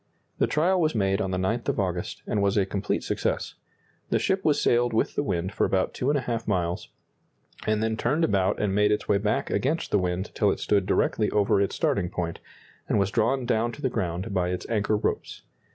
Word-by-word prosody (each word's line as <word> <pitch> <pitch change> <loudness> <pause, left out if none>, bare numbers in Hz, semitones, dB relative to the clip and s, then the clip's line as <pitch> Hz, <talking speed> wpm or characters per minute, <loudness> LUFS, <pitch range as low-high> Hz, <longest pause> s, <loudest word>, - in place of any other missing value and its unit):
The - - +3
trial 180 +5 +2
was 155 -4 +1
made 95 -2 +1
on 95 - -1
the 95 - -1
9th 110 +6 -1
of - - -1
August, 90 -3 -3
and 105 - 0
was 100 +1 +2
a 100 - +3
complete 100 +1 -2
success. - - -2 0.6
The - - +2
ship 190 0 0
was 145 -2 +3
sailed 120 -2 +2
with 110 - +1
the - - 0
wind 95 -6 -2
for - - 0
about 95 -1 +1
2½ 125 -4 -1
miles, 90 -4 -1 0.8
and 110 0 +1
then 110 0 0
turned 140 +9 0
about 100 -9 +1
and 105 -2 0
made 105 +1 +3
its 105 - 0
way 100 - +3
back 105 +1 -1
against 155 +6 0
the 105 - +4
wind 90 +2 -2
till 105 - +2
it - - -1
stood 100 -2 +1
directly 105 -2 +1
over 100 -1 +2
its 100 - 0
starting 90 -3 0
point, 85 -2 -4 0.5
and - - +2
was 100 -1 +1
drawn 125 +3 +1
down 120 0 +1
to 145 - -10
the 130 - +1
ground 95 0 -2
by 90 -2 +1
its 90 - -4
anchor 105 -1 +1
ropes. - - -3
105 Hz, 215 wpm, -26 LUFS, 95-120 Hz, 0.8 s, the